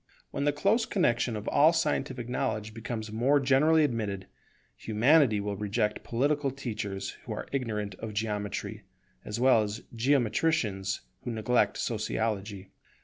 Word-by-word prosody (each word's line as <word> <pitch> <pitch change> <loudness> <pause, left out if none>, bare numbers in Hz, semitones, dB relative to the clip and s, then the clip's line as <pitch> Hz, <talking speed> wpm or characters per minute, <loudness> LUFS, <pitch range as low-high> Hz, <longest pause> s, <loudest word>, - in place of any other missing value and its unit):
When 140 - -2
the 145 - +4
close 205 +10 +1
connexion 120 - +1
of 105 0 -6
all 155 +3 +5
scientific 135 -6 -1
knowledge 125 -4 -2
becomes 110 -1 -5
more 130 +6 +3
generally 145 +4 +4
admitted, 105 -8 -2 0.5
Humanity 115 +1 +3
will 100 0 -3
reject 105 +1 -1
political 140 +4 0
teachers 110 -7 -4
who - - -4
are - - -6
ignorant 105 -7 -2
of 110 -2 -6
Geometry, 105 -1 -3 0.4
as 105 +2 -5
well 125 -3 +5
as 105 +2 -4
geometricians 115 -5 +1 0.2
who 125 - -4
neglect 115 +1 +1
Sociology. 105 -3 -2
115 Hz, 135 wpm, -29 LUFS, 105-140 Hz, 0.5 s, all